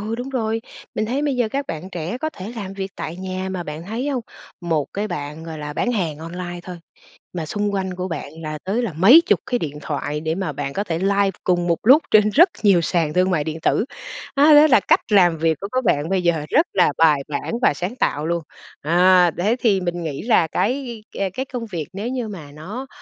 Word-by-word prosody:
ừ, 215 +2 -3
đúng 245 +3 -5
rồi, 225 -4 -1 0.3
mình 215 - -1
thấy 260 +6 -1
bây 285 -3 0
giờ 240 -3 +1
các 275 +4 -3
bạn 165 +4 -6
trẻ 175 +6 -4
có 315 +3 -2
thể 205 -3 -8
làm 195 -3 -5
việc 195 0 -4
tại 165 - -5
nhà 185 0 -4
mà 185 -2 -3
bạn 150 -1 -7
thấy 235 +7 -3
hông, 260 -4 -1 0.4
một 160 -4 0
cái 210 +2 -2
bạn, 150 0 -5
gọi 160 -1 -7
là, 150 0 -5
bán 245 +11 -1
hàng 165 -9 -2
online 175 +2 -6
thôi 180 0 -8 0.6
mà 170 -3 -3
xung 205 +5 -2
quanh 190 -1 -2
của 180 0 -4
bạn 165 -5 -5
là 155 -1 -4
tới 200 +6 -1
là 225 -8 -3
mấy 205 - +7
chục - - +3
cái 250 -2 -1
điện 150 -5 -4
thoại 150 0 -3
để 160 +1 -1
mà 185 -5 -2
bạn 140 0 -4
có 200 - -1
thể 165 -5 -2
live 200 +1 +2
cùng 175 -1 +1
một 170 -1 +2
lúc 270 +8 +7
trên 210 -1 +6
rất 340 - +6
nhiều 195 -4 +5
sàn 165 -2 0
thương 185 +1 +2
mại 160 -5 +1
điện 155 +1 -5
tử. 220 - +2 0.5
À, 280 - +4
đó 295 +1 +8
là 275 - +6
cách - - +3
làm 175 -5 +5
việc 160 -1 +1
của 200 - -3
các 255 0 0
bạn 150 -5 +1
bây 190 -1 +1
giờ, 170 -4 +1
rất 325 +4 +3
là 180 -6 +3
bài 155 -3 +5
bản 145 -1 -4
và - - +4
sáng 180 +10 -4
tạo 150 - 0
luôn. 170 0 -1 0.4
À, 180 +2 +5
thế 210 +7 +1
thì 205 -6 +2
mình 175 -1 -3
nghĩ 145 -4 -4
là 215 -7 +3
cái, 240 - -2 0.2
à, 195 - 0
cái 260 - -3
công 250 -4 -5
việc 175 -8 -5
nếu 200 +4 -4
như 250 -3 -3
mà 165 -9 -9
nó, 195 - -7
185 Hz, 245 wpm, -21 LUFS, 165-225 Hz, 0.6 s, đó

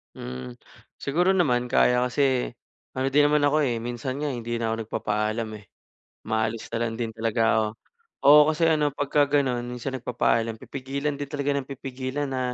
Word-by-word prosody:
Hmm, 65 0 -7 0.4
siguro 175 +7 +2
naman 125 -10 +1
kaya 125 -1 +4
kasi, 130 0 +1 0.4
ano 130 +1 -1
din 145 +2 +4
naman 150 -1 +4
ako, 150 +1 +2
eh, 120 -4 0
minsan 120 +3 -4
nga 150 - -1
hindi 120 -3 -3
na 115 - -1
ako 115 0 -2
nagpapaalam, 110 +1 -2
eh, 105 -2 -14 0.5
umaalis 110 0 -2
na 115 - -2
lang 115 - -3
din 115 0 -3
talaga 115 +1 -1 0.2
ako. 110 - +2 0.6
Oo, 150 +1 +10
kasi 165 +1 +2
ano 150 -3 +2
pagka 145 +1 +2
gano'n 135 -4 +1
minsan 125 +2 -5
nagpapaalam 115 -2 0
pipigilan 140 +4 -4
din 145 - -4
talaga 140 0 -1
ng 135 - -3
pipigilan 135 +1 -4
na, 130 -1 -2
130 Hz, 170 wpm, -25 LUFS, 115-145 Hz, 0.6 s, Oo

